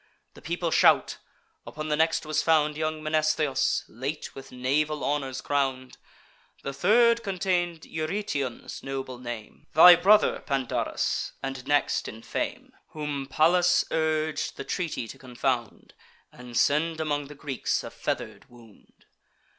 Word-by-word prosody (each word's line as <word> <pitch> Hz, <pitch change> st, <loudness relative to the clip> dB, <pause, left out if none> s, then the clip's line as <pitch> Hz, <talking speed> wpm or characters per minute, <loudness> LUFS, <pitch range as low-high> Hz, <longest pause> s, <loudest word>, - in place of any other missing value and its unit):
The -, -, -15 dB
people 170 Hz, 0 st, -2 dB
shout. -, -, +4 dB, 0.4 s
Upon 155 Hz, +1 st, -6 dB
the 150 Hz, -, +2 dB
next 160 Hz, +1 st, +1 dB
was 155 Hz, 0 st, 0 dB
found 150 Hz, -2 st, +3 dB
Young 155 Hz, 0 st, -3 dB
Mnestheus, 155 Hz, -3 st, +1 dB
late 135 Hz, +6 st, -5 dB
with 135 Hz, 0 st, -11 dB
naval 145 Hz, +4 st, 0 dB
honours 140 Hz, -3 st, -2 dB
crown'd. 135 Hz, -2 st, -2 dB, 0.6 s
The 140 Hz, -, -4 dB
third 235 Hz, -, +4 dB
contain'd 180 Hz, -4 st, -1 dB
Eurytion's 155 Hz, -, -4 dB
noble 135 Hz, -2 st, -5 dB
name, 120 Hz, -3 st, -8 dB
Thy 175 Hz, +2 st, +10 dB
brother, 200 Hz, +5 st, +4 dB
Pandarus, 135 Hz, -4 st, -2 dB
and 135 Hz, -1 st, -5 dB
next 145 Hz, 0 st, +1 dB
in 110 Hz, +1 st, -9 dB
fame, -, -, -4 dB, 0.2 s
Whom 150 Hz, -3 st, -4 dB
Pallas 175 Hz, +5 st, +3 dB
urg'd 155 Hz, -1 st, -1 dB
the -, -, -5 dB
treaty 165 Hz, -9 st, -3 dB
to -, -, -11 dB
confound, 125 Hz, -2 st, -3 dB, 0.4 s
And 125 Hz, -1 st, -8 dB
send 160 Hz, +3 st, +2 dB
among 145 Hz, -2 st, -1 dB
the 150 Hz, -, -11 dB
Greeks 140 Hz, -2 st, -2 dB
a -, -, -7 dB
feather'd -, -, -5 dB
wound. 115 Hz, -3 st, -20 dB
150 Hz, 130 wpm, -27 LUFS, 135-160 Hz, 0.6 s, Thy